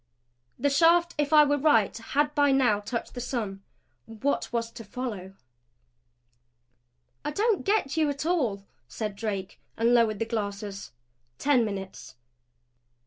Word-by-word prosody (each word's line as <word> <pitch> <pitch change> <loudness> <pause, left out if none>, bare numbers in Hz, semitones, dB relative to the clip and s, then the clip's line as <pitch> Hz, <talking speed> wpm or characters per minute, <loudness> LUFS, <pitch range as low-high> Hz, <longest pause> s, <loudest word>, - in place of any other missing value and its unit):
The 285 - +1
shaft, 340 +4 +4
if 290 0 0
I 305 -1 +8
were 290 0 +1
right, 250 -9 +3
had 290 +6 -1
by 290 -1 +3
now 250 -6 +3
touched 230 +3 -5
the 245 - -5
sun. 220 -6 -4 0.5
What 225 +6 -2
was 230 -1 -2
to 230 - -10
follow? 205 -4 -6 1.9
"I - - -2
don't 415 +6 +1
get 395 -9 +1
you 310 -2 +3
at 285 +1 -4
all," 245 - 0 0.2
said 210 - -5
Drake, 200 -2 -4 0.2
and 230 +2 +3
lowered 230 -3 +3
the 225 - -1
glasses. 205 -3 -4 0.5
Ten 275 -4 +3
minutes. 195 - -6
240 Hz, 140 wpm, -27 LUFS, 210-290 Hz, 1.9 s, I